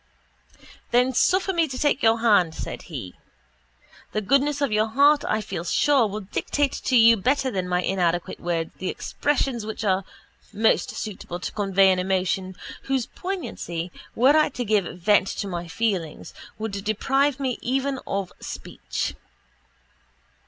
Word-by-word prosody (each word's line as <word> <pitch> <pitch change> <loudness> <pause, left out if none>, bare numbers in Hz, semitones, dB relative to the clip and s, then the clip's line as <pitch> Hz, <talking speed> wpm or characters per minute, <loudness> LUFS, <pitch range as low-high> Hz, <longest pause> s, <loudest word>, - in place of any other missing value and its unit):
—Then 250 +2 +3
suffer 375 +9 +2
me 335 -2 +2
to 260 -2 -6
take 290 0 +1
your 225 0 +3
hand, 195 -8 +4
said - - -6
he. 120 - -6 1.0
The 215 - 0
goodness 275 +6 +2
of 280 -5 0
your 215 +1 +2
heart, 285 +6 +4
I 215 - +1
feel 185 -4 -5
sure, 265 - +3
will 210 +1 -5
dictate 275 +8 -1
to 260 - +2
you 230 0 +7
better 260 +5 +1
than 185 -4 -2
my 180 0 +1
inadequate 175 -2 0
words 165 -2 -2
the 185 - -2
expressions 270 -5 -1
which 220 +1 -5
are 195 -2 +1 0.5
most 220 +2 +2
suitable 185 -4 -6
to - - -4
convey 195 -2 +3
an 185 - +1
emotion 185 0 -1 0.3
whose 265 -3 0
poignancy, 185 - -5 0.2
were 260 +6 +5
I 310 -1 +4
to 250 -3 -4
give 210 -3 +2
vent 190 +2 +3
to 200 - -3
my 175 -2 -4
feelings, 175 -3 -2 0.2
would 220 0 -4
deprive 270 +6 +1
me 260 -3 -2
even 270 +2 -1
of 195 -2 -3
speech. - - -5
215 Hz, 150 wpm, -24 LUFS, 185-270 Hz, 1.0 s, you